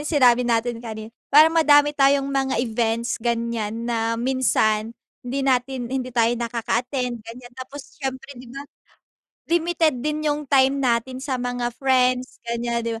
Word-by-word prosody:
sinabi 250 -5 +3
natin 230 0 0
kani 220 -1 -8 0.2
para 310 +3 +6
madami 295 -2 +5
tayong 275 -1 +3
mga 270 -1 0
events 230 0 -1
ganyan 230 -1 -2
na 230 -1 -1
minsan 230 -3 0 0.2
hindi 265 +2 -3
natin 255 -1 -1
hindi 255 -1 -2
tayo 235 -2 +2
nakaka-attend 240 +1 -2
ganyan 240 +3 -12
tapos 265 +4 -11
siyempre 270 0 -5
di 245 - -13
ba, 275 +3 -8 0.8
limited 330 -5 +1
din 300 0 -1
yung 295 0 -1
time 270 0 +3
natin 245 +1 0
sa 260 -1 -3
mga 245 -1 -2
friends 255 -1 +1
ganyan, 235 0 -2
di 230 - -2
250 Hz, 145 wpm, -22 LUFS, 235-270 Hz, 0.8 s, para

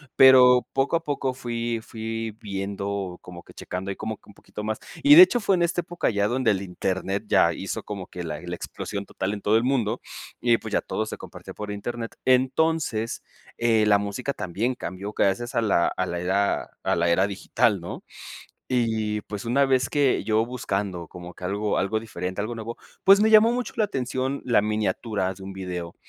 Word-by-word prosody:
pero 125 -1 +7
poco 135 +4 +1
a 165 - 0
poco 140 -3 -2
fui 120 -2 -3
fui 115 0 -5
viendo, 100 -2 -4
como 85 -1 -11
que - - -16
checando 95 +2 -5
ahí 100 - -4
como 110 0 -4
que - - -24
un - - -14
poquito 105 - -9
más 110 0 -2 0.2
y 290 +1 +9
de 355 - +12
hecho 250 -9 +2
fue 200 -2 +3
en 175 - +1
este 170 +1 0
época 175 0 -2
ya 100 -2 +1
donde 125 -1 +2
el 95 -2 -1
Internet 95 +1 -2
ya - - +4
hizo - - -5
como 100 -3 -6
que 90 - -7
la 75 -3 -5
la 90 +1 -5
explosión 100 +3 -6
total 95 0 -3
en 105 - -6
todo 105 +2 +3
el 115 - +1
mundo, 120 -3 0 0.4
y 120 -1 +3
pues, 110 - -8
ya - - +2
todo 110 - -3
se - - -6
compartía - - -10
por 105 0 -7
Internet. 115 +3 -5
Entonces, 130 -2 +1 0.3
eh, 115 -2 +3
la 105 -1 +5
música 100 +7 -3
también 110 +5 -2
cambió 95 +2 -6
gracias 105 +4 0
a 115 - +3
la 100 -6 +2
a 95 - -2
la 85 -1 -3
era 95 +3 +1 0.2
a - - +1
la 85 0 +1
era 95 +3 +3
digital, 100 0 0
¿no?, 85 - -7 0.7
y 110 -4 0
pues 105 -1 -7
,una 130 +4 +3
vez 130 -1 +2
que 145 -3 +2
yo 110 0 +2
buscando 100 -8 -3
como 90 -1 -10
que - - -11
algo 100 +3 -1
algo 110 +3 0
diferente 95 -3 -5
algo 110 +3 -3
nuevo, 115 +1 -6 0.3
pues, 195 +1 +7
me 220 +1 +4
llamó 220 +2 +7
mucho 250 +1 -3
la 220 - +3
atención 130 -4 -2
la 120 -5 +3
miniatura 105 -2 -1
de 95 - -13
un 95 - -7
video. 90 -3 -5
110 Hz, 205 wpm, -25 LUFS, 95-125 Hz, 0.7 s, de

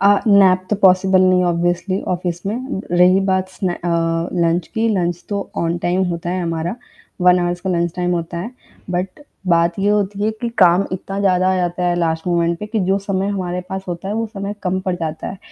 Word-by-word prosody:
अ, 200 - +5 0.2
nap 190 -2 +5
तो 210 - +2
possible 190 -1 +4
नहीं 185 0 +4
है - - +2
ऑब्वियस्ली 175 +2 0
ऑफिस 175 -1 -4
में। 240 +1 -3
रही 180 +2 +5
बात 185 0 +1
सने 185 -1 -3
अ, 175 - -5 0.6
लंच 170 +1 +1
की, 225 0 +1
लंच 175 -5 -1
तो 200 -1 -3
ऑन 170 +1 -1
टाइम 180 +2 +1
होता 170 0 -3
है 185 0 -1
हमारा। 165 +1 -2 0.5
1 180 0 +5
हॉर्स 175 0 -1
का 190 0 -2
लंच 170 -1 0
टाइम 180 0 0
होता 170 0 -3
है। 185 +7 -5 0.4
बट 185 +7 -3 0.3
बात 170 +1 +2
ये 200 - +1
होती 205 -1 0
है 215 - +2
कि 235 - -1
काम 180 +1 +5
इतना 195 +1 -4
ज़्यादा 185 -1 +2
आ 185 - +1
जाता 180 0 -1
है 175 - +2
लास्ट 160 -1 -1
मोमेंट 170 -1 +1
पे 210 - -5
कि 215 0 -2
जो 195 +1 +3
समय 195 0 -2
हमारे 180 -3 -2
पास 190 0 -5
होता 175 +2 -5
है 205 - -2
वो 225 +1 -1
समय 200 -2 -5
कम 185 0 0
पड़ 185 - +1
जाता 160 -2 -4
है। 190 - -7
185 Hz, 220 wpm, -19 LUFS, 175-195 Hz, 0.6 s, अ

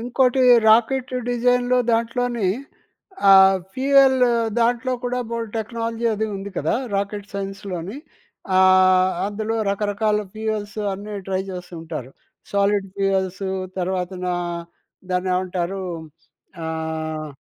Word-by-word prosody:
ఇంకోటి 250 +2 +2 0.3
రాకెట్ 250 +4 +3 0.2
డిజైన్‌లో 245 +1 +2
దాంట్లోని 230 -2 0 0.8
ఆహ్, 190 0 +8 0.2
ఫ్యూయల్ 270 0 +4 0.4
దాంట్లో 240 +2 +1
కూడా 250 0 -1
బోలెడు 230 -2 -3
టెక్నాలజీ 230 +1 -3
అది 220 +1 -1
ఉంది 195 +1 -6
కదా! 155 - 0 0.2
రాకెట్ 200 +1 -3
సైన్స్‌లోని 195 0 -5 0.6
ఆహ్, 185 0 +5
అందులో 215 +2 -3
రకరకాల 210 +1 0 0.2
ఫ్యూయల్స్ 215 -1 -3
అన్నీ 205 +2 -7
ట్రై 190 0 0
జేసుంటారు. 165 -7 -7 0.4
సాలిడ్ 200 0 +2
ఫ్యూయల్స్ 195 -1 0 0.4
తర్వాతన 180 0 -2 0.8
దాన్ని 180 +1 0
ఏమంటారు, 185 +1 -2 0.8
ఆహ్, 160 -1 -4
200 Hz, 95 wpm, -22 LUFS, 185-230 Hz, 0.8 s, ఆహ్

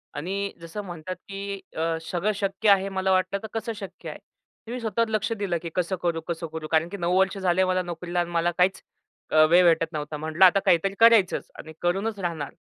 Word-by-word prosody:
आणि 195 +6 -3
जसं 170 +5 -6
म्हणतात, 175 +1 -6
की 200 +1 -7 0.2
अ, 165 0 0
सगळं 180 +5 -1
शक्य 200 +1 0
आहे 195 0 +4
मला 190 0 0
वाटलं 185 +1 +1
तर - - -4
कसं 225 0 -3
शक्य 200 -3 -8
आहे? - - -8 0.5
मी 250 - -4
स्वतःवर 230 0 0
लक्ष 215 +1 -1
दिलं, 200 -5 -2
की 170 - -5
कसं 180 +1 0
करू? 170 -2 -1
कसं 170 0 -3
करू? 155 -1 -5
कारण 160 +1 +3
की 200 - -6
9 175 0 +1
वर्ष 190 +1 +2
झाले 185 -1 +2
मला 185 0 +1
नोकरीला 175 0 -4
आणि 175 0 -1
मला 170 0 +1
काहीच 185 +1 +2 0.7
वेळ 175 +2 +6
भेटत 165 -1 +3
नव्हता. 150 0 -4
म्हटलं 160 +4 +3
आता 190 +2 +6
काहीतरी 190 +3 +3
करायचंच 225 -5 +5
आणि 160 0 -9
करूनच 195 +5 -1
राहणार. 165 -6 -4
185 Hz, 205 wpm, -25 LUFS, 170-195 Hz, 0.7 s, वेळ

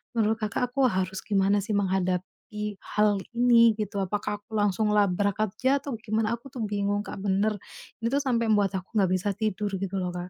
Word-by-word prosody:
menurut 220 0 +2
Kakak 225 +4 -1
aku 270 -2 +4
harus 190 0 -2
gimana 200 0 +2
sih 215 - -5
menghadapi 190 +2 -2
hal 210 -1 +2 0.2
ini 235 -2 +6
gitu, 205 -1 -2
apakah 205 +2 -3
aku 215 - -37
langsung 210 +1 +1
labrak 200 0 +2
aja 260 +7 +1
atau 280 -4 -4
gimana 220 0 0
aku 270 +4 -14
tuh 240 -4 -3
bingung, 205 0 0
Kak, - - -7
bener. 205 +2 +1 0.5
Ini 230 - +2
tuh 285 - +2
sampai 235 -3 +1
mbuat 205 -2 +3
aku 185 - -8
nggak 190 -2 +3
bisa 185 +2 +1
tidur 210 -1 -2
gitu 195 0 -3
loh, 180 -1 -2
Kak. 180 +1 -5
205 Hz, 190 wpm, -27 LUFS, 195-220 Hz, 0.5 s, ini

